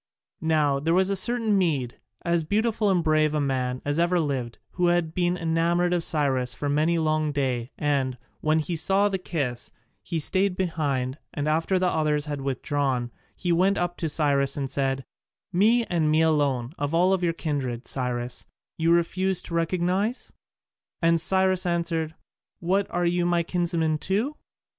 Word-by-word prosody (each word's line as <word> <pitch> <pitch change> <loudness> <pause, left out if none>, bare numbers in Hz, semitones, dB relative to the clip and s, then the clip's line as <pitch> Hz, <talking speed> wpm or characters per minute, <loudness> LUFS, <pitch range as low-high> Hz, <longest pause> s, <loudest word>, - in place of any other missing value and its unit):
Now 150 -3 +2
there 165 +4 +1
was 190 +1 +3
a - - +1
certain 225 +1 +2
Mede, 150 -10 0 0.3
as 170 -1 +2
beautiful 215 +4 +1
and 180 -3 +2
brave 155 -1 +2
a - - +1
man 130 -2 -1
as 145 +2 0
ever 175 +1 +2
lived, 130 -7 -2
who 180 -1 +1
had 175 -2 +1
been 175 0 0
enamoured 170 +1 +1
of 175 -1 0
Cyrus 130 -7 0
for 145 - -3
many 155 +4 +2
a 165 - 0
long 155 -1 +1
day, 130 -3 -2
and, 135 -4 0 0.2
when 155 +1 +2
he 160 +2 -1
saw 195 +5 +3
the 190 -1 -2
kiss, 140 -9 -3 0.3
he 170 - -4
stayed 185 +4 +1
behind, 145 -7 -1 0.2
and 145 -1 -2
after 165 +5 +1
the 185 0 +1
others 150 -3 +1
had 145 -2 -4
withdrawn 135 -2 -1 0.2
he 175 - -2
went 190 +4 +3
up 175 0 -1
to 165 - -2
Cyrus 140 -3 +2
and 140 -1 -2
said, 135 -1 -1 0.5
"Me, 225 +6 +4
and 165 -5 0
me 155 +1 +3
alone, 140 -5 +1
of 145 +2 -1
all 185 +3 +4
your 170 - +2
kindred, 140 -7 -3
Cyrus, 125 -2 -3 0.3
you 165 +1 +3
refuse 180 +2 +1
to - - -8
recognize?" 180 +7 -1 0.7
And 165 0 +4
Cyrus 190 +1 +2
answered, 165 -2 -1 0.4
"What, 190 +3 +1
are 175 0 -1
you 175 0 +1
my 175 -1 +2
kinsman 170 -3 0
too?" 215 - -1
160 Hz, 170 wpm, -25 LUFS, 145-180 Hz, 0.7 s, Me